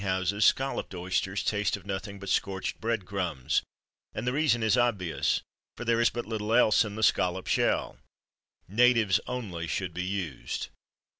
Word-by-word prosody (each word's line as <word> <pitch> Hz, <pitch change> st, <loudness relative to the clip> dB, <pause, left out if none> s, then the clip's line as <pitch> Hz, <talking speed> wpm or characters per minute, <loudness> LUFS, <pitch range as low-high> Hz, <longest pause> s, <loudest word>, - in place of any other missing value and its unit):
At -, -, -5 dB
most -, -, -1 dB
eating 95 Hz, -, +2 dB, 0.2 s
houses, 105 Hz, -, +3 dB
Scalloped 135 Hz, -7 st, +1 dB
Oysters 95 Hz, +2 st, -1 dB
taste 105 Hz, -1 st, 0 dB
of 95 Hz, -, -16 dB
nothing 100 Hz, +1 st, -4 dB
but 100 Hz, 0 st, -9 dB
scorched 95 Hz, 0 st, -1 dB
bread 115 Hz, -4 st, -1 dB
crumbs; 90 Hz, -10 st, -1 dB, 0.5 s
and -, -, -3 dB
the 125 Hz, -, 0 dB
reason 140 Hz, -6 st, +2 dB
is 110 Hz, 0 st, +4 dB
obvious, 105 Hz, -9 st, +1 dB, 0.3 s
for 120 Hz, -, -6 dB
there 115 Hz, 0 st, +2 dB
is 120 Hz, -, +5 dB
but 120 Hz, -, -5 dB
little 110 Hz, 0 st, -1 dB
else 120 Hz, -2 st, +5 dB
in 105 Hz, -2 st, -6 dB
the 110 Hz, -, -3 dB
scallop 90 Hz, -2 st, +2 dB
shell. -, -, +1 dB, 0.7 s
Natives 115 Hz, 0 st, +4 dB
only 100 Hz, -10 st, -4 dB
should 90 Hz, +1 st, -2 dB
be 90 Hz, -, -3 dB
used. 95 Hz, -9 st, -4 dB
100 Hz, 175 wpm, -28 LUFS, 95-115 Hz, 0.7 s, is